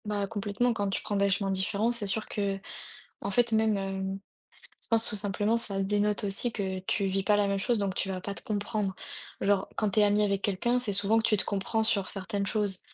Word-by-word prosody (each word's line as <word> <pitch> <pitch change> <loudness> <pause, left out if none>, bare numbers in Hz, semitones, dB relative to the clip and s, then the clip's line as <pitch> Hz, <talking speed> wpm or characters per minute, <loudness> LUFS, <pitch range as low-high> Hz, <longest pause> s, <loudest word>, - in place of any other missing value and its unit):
Bah, 205 -1 -1
complètement. 205 +3 0
Quand 205 -3 -1
tu 195 - -2
prends 205 - -2
des 200 0 +3
chemins 195 0 0
différents, 200 +4 +1
c'est 235 -4 -2
sûr 215 +2 0
qu'en 195 -1 -4 0.5
fait, 235 +3 +2
même, 220 -1 +3
hem, 195 0 -3 0.6
je - - -16
pense 225 -1 +4
tout - - -1
simplement, 205 +2 0
ça 200 -4 0
dénote 205 +1 +1
aussi 205 +4 0
que 190 -3 -3
tu 195 +2 -1
vis 195 0 0
pas 210 +2 +3
la 205 -1 +2
même 200 0 0
chose 235 +4 +1
donc 200 -2 -1
tu 195 - -2
vas 185 -1 -3
pas 200 - -4
te - - -10
comprendre. 205 -2 -2 0.4
Genre 200 0 +1
quand 215 -2 0
tu 215 - +2
es - - +6
amie 205 +1 +3
avec 200 -1 +1
quelqu'un, 215 +6 +1
c'est 225 -5 -1
souvent 205 +3 +3
que - - -2
tu 215 - +3
te - - 0
comprends 205 +3 0
sur 200 -3 +1
certaines 200 0 -2
choses 205 -4 -1
205 Hz, 230 wpm, -29 LUFS, 195-215 Hz, 0.6 s, es